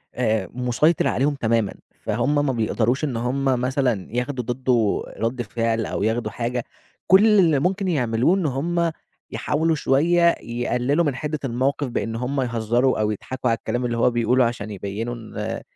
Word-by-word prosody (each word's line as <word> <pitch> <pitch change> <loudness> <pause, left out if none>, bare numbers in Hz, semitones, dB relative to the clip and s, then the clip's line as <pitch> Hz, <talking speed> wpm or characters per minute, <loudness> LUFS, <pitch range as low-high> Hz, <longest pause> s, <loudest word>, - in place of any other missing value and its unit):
آآ، 110 -6 0
مُسيطِر 125 +6 +2
عليهم 145 +3 +1
تمامًا، 115 -5 0 0.3
فهُم 145 +7 0
ما 135 - +1
بيقدَرش 120 +4 0
إن 130 -6 -1
هُم 130 +4 -1
مثلًا 125 -4 0
ياخدوا 125 0 -2
ضِدّه 120 -3 0
رَد 120 +2 -1
فِعل 115 0 -1
أو - - -3
ياخدوا 110 -1 0
حاجة، 120 +2 -2 0.4
كلّ 190 +4 +6
اللي 160 -6 +4
ممكن 190 +4 0
يعملوه 125 +1 +2
إن 185 -4 -1
هُم 165 +5 0 0.4
يحاولوا 160 +2 0
شويّة 170 +5 +3
يقلّلوا 125 +6 0
من 140 -3 0
حِدّة 150 +1 -3
الموقِف 135 +3 0
بإن 115 -1 -3
هُم 130 +3 -1
يهزّروا 120 +1 +1
أو 105 0 +1
يضحَكوا 125 +4 -3
على 115 - +2
الكلام 120 +4 -3
اللي 120 -1 -1
هو 120 +1 +3
بيقوله 120 +2 +2
عشان 110 -3 -3
يبيّنوا 105 +5 -4
إن 110 -1 -5
125 Hz, 160 wpm, -23 LUFS, 115-140 Hz, 0.4 s, كلّ